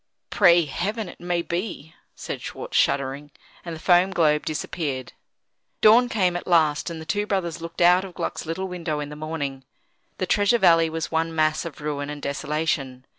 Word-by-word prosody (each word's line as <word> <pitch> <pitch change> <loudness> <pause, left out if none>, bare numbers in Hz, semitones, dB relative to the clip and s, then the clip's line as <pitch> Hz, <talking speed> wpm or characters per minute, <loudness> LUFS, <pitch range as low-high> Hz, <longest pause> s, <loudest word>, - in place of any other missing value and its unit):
"Pray 175 -4 +5
Heaven 205 +9 -3
it - - -11
may 175 -1 -1
be!" 170 -4 -4 0.2
said - - -6
Schwartz, - - -7
shuddering. 140 +1 +1 0.3
And 170 -2 -6
the - - -9
foam 175 +2 +4
globe 155 -5 +2
disappeared. 145 -4 -3 0.7
Dawn 235 +3 +6
came 185 -7 +1
at 175 - -5
last, 160 -3 +2
and 165 -1 -6
the 160 - -8
two 205 +5 -1
brothers 170 -5 -2
looked 165 +1 -6
out 180 +2 +6
of 190 -2 -9
Gluck's - - -4
little 185 +4 -3
window 170 -4 -3
in 145 -1 -5
the 150 - -8
morning. 145 -3 -4 0.5
The 185 - -1
Treasure 205 +5 +3
Valley 165 -5 +5
was 160 0 -4
one 165 0 -1
mass 155 +1 +1
of 155 -3 -8
ruin 145 -1 -3
and 150 0 -6
desolation. 140 -3 -2
165 Hz, 180 wpm, -24 LUFS, 150-180 Hz, 0.7 s, Dawn